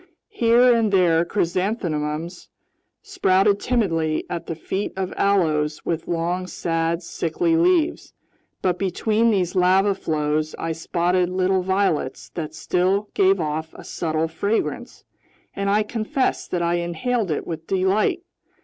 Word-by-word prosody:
Here 240 +1 +4
and 225 -3 +1
there 170 -4 +4
chrysanthemums 170 -3 -2 0.5
sprouted 200 - +2
timidly 165 -12 0
at 170 - -4
the 165 - -3
feet 190 +5 -4
of 190 -1 -3
aloes 155 -6 +1
with 165 -1 -2
long, 175 +2 -1
sad, 165 0 -1
sickly 330 - -1
leaves. 340 -1 +2 0.5
But 180 -1 +1
between 215 +4 +1
these 185 -5 +1
lava 190 +2 +4
flows 155 -3 -1
I 165 - -3
spotted 175 +2 0
little 185 +1 +1
violets 190 -7 -1
that 160 -2 -6
still 190 +5 0
gave 195 0 +3
off 160 0 -3
a - - -11
subtle 160 -1 -2
fragrance, 200 +7 -3 0.5
and 200 0 -1
I 210 +2 +3
confess 235 +5 -1
that 175 -1 -2
I 170 +1 +1
inhaled 180 +6 -1
it 155 - -2
with 160 -1 -6
delight. 195 - +1
180 Hz, 130 wpm, -22 LUFS, 165-205 Hz, 0.5 s, Here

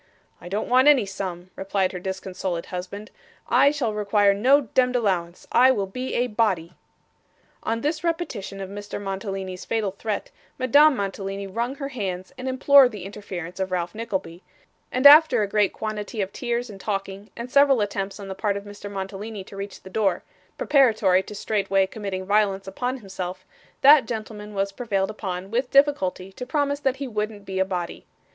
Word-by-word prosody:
'I 175 - -9
don't 205 +3 -2
want 255 +3 +4
any 275 -7 +6
sum,' 185 -2 -6
replied 190 -1 -1
her 180 - -6
disconsolate 185 -2 -4
husband; 190 +3 -7 0.4
'I 260 +4 +5
shall 270 -7 -1
require 205 -1 +3
no 260 +8 +4
demd 255 -1 +1
allowance. 185 -7 -1
I 255 +2 +6
will 210 -7 +1
be 255 +7 -5
a 245 - +2
body.' 205 -7 0 0.9
On 230 +1 -2
this 310 +2 -1
repetition 325 - -3
of 190 - -5
Mr. 205 0 -6
Mantalini's 195 -2 -5
fatal 220 -4 -1
threat, 205 +2 -4 0.3
Madame 285 +3 +5
Mantalini 195 0 -4
wrung 235 +7 -3
her 275 -1 -5
hands, 190 -7 -5
and 255 +1 -4
implored 260 0 +6
the 205 -4 -8
interference 185 -3 -7
of 190 0 -1
Ralph 175 -1 -2
Nickleby; 195 -6 -4 0.5
and 255 +2 -1
after 300 -5 +8
a - - -1
great 205 -1 +2
quantity 215 +1 -5
of 195 -1 -2
tears 240 -1 -2
and 200 -4 -11
talking, 195 0 -4
and 240 +2 -6
several 280 -2 +5
attempts 200 -1 -3
on 200 - -8
the 190 - -4
part 200 +1 -1
of 200 - -7
Mr. 205 0 -9
Mantalini 200 +1 -6
to 195 - -13
reach 195 0 -7
the 190 - -10
door, 195 -4 0 0.3
preparatory 220 -9 +4
to 210 +2 -10
straightway 195 -2 +1
committing 190 -2 -5
violence 195 -1 +1
upon 250 +7 -3
himself, 185 -4 -6 0.4
that 280 -3 +7
gentleman 215 -2 -6
was 195 0 0
prevailed 195 -3 -1
upon, 190 -2 -5
with 250 +2 0
difficulty, 275 -10 +2
to 220 - -8
promise 285 +1 0
that 270 -3 0
he 275 0 -5
wouldn't 210 -2 -4
be 190 -1 -3
a - - +5
body. 180 -3 -5
205 Hz, 180 wpm, -24 LUFS, 190-245 Hz, 0.9 s, after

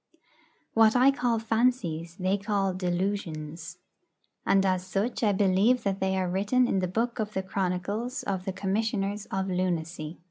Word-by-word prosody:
What 225 0 +5
I 255 +2 +6
call 245 -3 0
fancies 220 -8 0
they 190 0 0
call 200 -2 0
'delusions.' 175 -3 -3 0.7
And 195 0 +4
as 185 -1 +1
such 195 +5 -2
I 215 -3 +3
believe 200 +5 +3
that 195 -1 -1
they 190 0 0
are 185 -1 0
written 205 +8 +2
in 195 - +1
the 185 - 0
Book 230 +6 -1
of 215 -1 -2
the 190 - -2
Chronicles 200 +7 -2
of 190 -2 -3
the 190 - -1
Commissioners 200 +1 -1
of 190 0 -2
Lunacy. 175 -3 -2
195 Hz, 155 wpm, -28 LUFS, 185-220 Hz, 0.7 s, I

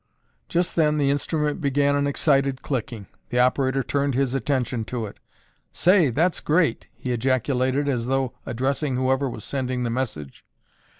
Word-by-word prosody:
Just 175 0 0
then 150 -2 +3
the 140 -2 +2
instrument 150 +3 -1
began 140 0 +2
an 145 0 +1
excited 140 -2 +1
clicking. 115 -6 -3 0.2
The 125 - -2
operator 130 +1 +2
turned 140 -1 0
his 135 -1 +1
attention 130 -4 -1
to 120 -1 -3
it. 100 - -10 0.5
"Say, 180 -4 +4
that's 165 +9 +1
great!" 155 -6 +1
he 125 - -4
ejaculated 130 +3 +1
as 125 -4 -1
though 135 -1 0
addressing 135 +3 -1
whoever 130 +1 +1
was 110 -3 -7
sending 130 -2 -2
the 120 - -1
message. 110 - -4
135 Hz, 155 wpm, -24 LUFS, 125-145 Hz, 0.5 s, Say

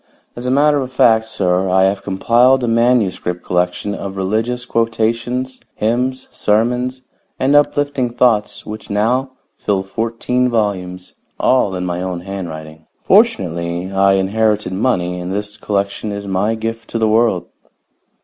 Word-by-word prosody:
As 120 +1 -5
a - - +1
matter 145 +2 +3
of 130 -1 -5
fact, 110 -3 +3
sir, 90 -2 0
I 95 +1 +4
have 95 +1 +1
compiled 120 +7 +3
a - - 0
manuscript 115 -7 +1
collection 90 +3 -1
of 100 -1 -6
religious 110 +6 -1
quotations, 115 +2 -1
hymns, 125 +4 -1
sermons 125 +4 0 0.3
and 135 +2 +2
uplifting 145 -3 +2
thoughts 120 -3 +1
which 110 +1 -8
now 125 +6 0 0.2
fill 100 -2 -1
fourteen 115 +5 -1
volumes, 95 -5 -2 0.3
all 125 -7 +2
in 90 0 -3
my 90 0 -2
own 90 -2 -3
handwriting. 80 -5 -7 0.2
Fortunately, 85 +2 +1
I 95 0 +3
inherited 105 +1 +1
money, 90 -5 0
and 90 +1 -5
this 105 +1 -4
collection 100 +1 -2
is 100 0 -5
my 100 +3 0
gift 115 +1 -5
to - - -2
the 110 -1 +2
world." 110 -4 +2
110 Hz, 140 wpm, -17 LUFS, 95-120 Hz, 0.3 s, I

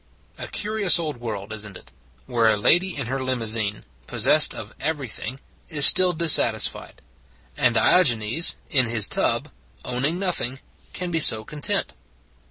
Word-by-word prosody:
A - - -7
curious 210 -5 +1
old 155 -5 -5
world, 110 -3 -8
is 110 -1 -5
n 105 -2 -11
t - - -10
it, - - -23 0.3
where 120 -3 0
a 110 - 0
lady 175 - +1
in 140 - -4
her 130 +3 -5
limousine, 115 -5 -2 0.2
possessed - - +3
of - - -10
every 145 -2 -4
thing, 120 +4 -7 0.3
is 150 -4 +4
still 185 -1 +7
dissatisfied: 150 - +1 0.5
and - - 0
Diogenes 120 -2 +2 0.2
in 130 -4 +2
his 110 -3 +2
tub, - - -1 0.4
owning 140 +7 -2
nothing, 175 -9 -2 0.3
can 180 -1 -6
be 165 - -1
so 110 -7 +5
content? 150 +3 -2
130 Hz, 155 wpm, -21 LUFS, 110-165 Hz, 0.5 s, still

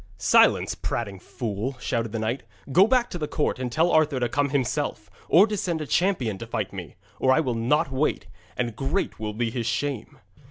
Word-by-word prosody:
'Silence, - - +4
prating 100 -5 -4
fool!' 115 +5 -4
shouted 115 -3 -2
the 115 - -3
knight, 110 +4 -2 0.3
'go 190 +8 +6
back 245 0 +3
to 175 - -6
the 150 - -2
court 150 -4 -1
and 125 -1 -3
tell 165 +7 +2
Arthur 155 -4 +3
to 120 - +1
come 140 +4 0
himself, 135 -4 -2 0.2
or 180 +6 +7
to 215 -1 -3
send 180 -5 -2
a 155 - -4
champion 140 - 0
to 115 - -7
fight 110 -4 -3
me, 90 -5 -8 0.2
or 130 - +3
I 130 - +4
will 130 -6 0
not 135 +7 +1
wait, 135 +3 0 0.3
and 120 -3 -2
great 135 - -2
will 105 -1 -3
be 115 +1 -1
his 115 -1 -3
shame.' 130 +1 -3
130 Hz, 205 wpm, -25 LUFS, 115-155 Hz, 0.3 s, or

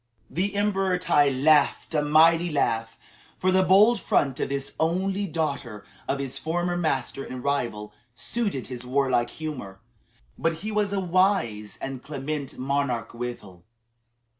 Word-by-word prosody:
The 195 +4 -1
Emperor 195 -2 +1
Tai 145 -5 +3
laughed 145 +4 +3
a 150 - +2
mighty 165 +3 +4
laugh, 115 -5 0 0.4
for 185 - +1
the 190 0 +4
bold 205 +5 +5
front 135 0 +1
of - - -1
this 140 0 -3
only 190 +5 0
daughter 140 - -3 0.2
of 135 - 0
his 135 -1 -3
former 175 +2 -1
master 135 -5 -1
and 125 -2 -7
rival, 115 -7 -2 0.2
suited 200 - -2
his 125 -1 -6
warlike 125 -1 +1
humor. 125 -12 -7 0.6
But 165 - +1
he 215 - -2
was 210 -1 0
a 200 - 0
wise 180 - +1
and 135 -2 -5
clement 145 0 -5
monarch 130 -3 -1
withal. 115 -7 -7
145 Hz, 140 wpm, -25 LUFS, 125-180 Hz, 0.6 s, bold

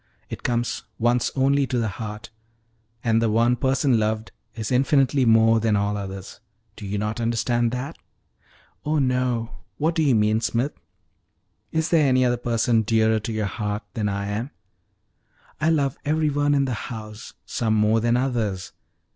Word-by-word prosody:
It - - -6
comes 120 -1 -1
once 120 +1 +2
only 135 +1 +2
to 125 - -1
the 115 -2 0
heart, 105 0 -7 0.7
and 115 -1 +2
the 115 - +2
one 115 +3 +3
person 130 -1 +2
loved 110 +1 -1 0.2
is 110 0 -4
infinitely 135 +1 +3
more 115 0 +5
than 110 -1 +1
all 100 0 0
others. 95 -1 -7 0.4
Do 105 - -8
you 100 +1 -2
not 105 +3 -2
understand 120 +1 +1
that?" 125 +6 -5 0.8
"Oh 155 +1 0
no; 125 -3 0 0.3
what 160 +3 +1
do 165 - 0
you 140 -5 +3
mean, 110 +1 +2
Smith?" 120 +5 -1 1.0
"Is 160 0 0
there 155 -4 +4
any 130 0 +3
other 120 0 +2
person 115 -1 +1
dearer 110 0 +2
to 110 - -5
your 110 -1 -1
heart 105 +1 -3
than 105 -4 -1
I 100 0 -2
am?" 110 +6 -3 1.1
"I 155 +2 +2
love 140 -4 +1
every 155 0 +1
one 145 0 +2
in 140 -1 +2
the 130 - -2 0.2
house, 110 -2 -8
some 110 -2 0
more 105 +1 +3
than 120 +2 +2
others. 115 -8 -2
115 Hz, 165 wpm, -23 LUFS, 110-130 Hz, 1.1 s, more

